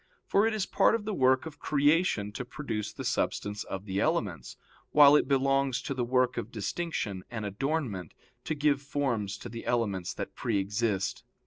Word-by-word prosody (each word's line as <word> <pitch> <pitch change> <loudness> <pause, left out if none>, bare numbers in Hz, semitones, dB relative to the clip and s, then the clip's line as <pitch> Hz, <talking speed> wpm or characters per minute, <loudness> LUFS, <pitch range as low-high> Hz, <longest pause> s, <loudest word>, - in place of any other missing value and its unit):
For 205 +3 +3
it 225 - 0
is 205 -3 0
part - - +3
of 220 -2 -4
the 215 - -2
work 130 -4 +3
of 160 -2 -9
creation 145 - +2
to 105 - -5
produce 120 -5 -4
the - - -7
substance 105 +1 -1
of 95 +1 -6
the 95 -1 -2
elements, 100 - -1 0.3
while 145 -1 +8
it 150 - +3
belongs 135 -1 +2
to - - -2
the 130 -2 -1
work 125 +1 +1
of - - -4
distinction 105 - -3
and 110 -3 -4
adornment 105 - -2 0.3
to 155 - -1
give 145 -1 +2
forms 130 -9 -2
to - - -8
the 115 0 -7
elements 100 -7 -1
that - - -5
pre - - -1
exist. 100 -1 -1
125 Hz, 185 wpm, -29 LUFS, 105-145 Hz, 0.3 s, while